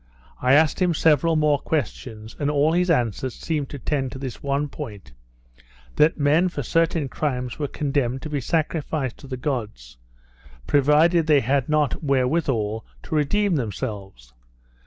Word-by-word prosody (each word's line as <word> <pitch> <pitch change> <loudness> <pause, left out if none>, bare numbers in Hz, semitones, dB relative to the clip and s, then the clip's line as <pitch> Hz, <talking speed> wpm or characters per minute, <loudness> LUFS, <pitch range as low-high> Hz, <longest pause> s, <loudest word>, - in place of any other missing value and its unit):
I 130 +2 +4
asked 155 +4 +3
him 175 -2 +2
several 160 +1 +3
more 150 -2 +3
questions, 110 -7 -4
and 145 -1 0
all 150 +1 +2
his 180 +2 +1
answers 125 - 0
seemed 150 -4 -3
to 145 - -7
tend 135 -1 -2
to - - -7
this 130 -3 -6
one 140 +1 -1
point, 100 - -9 0.9
that 155 - +4
men 155 +5 +3
for 145 -5 -5
certain 165 +1 +1
crimes 125 -2 -3
were 145 - -1
condemned 135 -3 -2
to 155 - -5
be 145 -2 -1
sacrificed 150 -2 -2
to 140 - -12
the 130 -1 -5
gods, 105 - -4 0.7
provided 155 - +3
they 150 -3 +5
had 135 +3 0
not 150 -1 +1
wherewithal 130 -6 0 0.2
to - - -7
redeem 180 +5 +1
themselves. 100 - -5
140 Hz, 155 wpm, -23 LUFS, 125-155 Hz, 0.9 s, they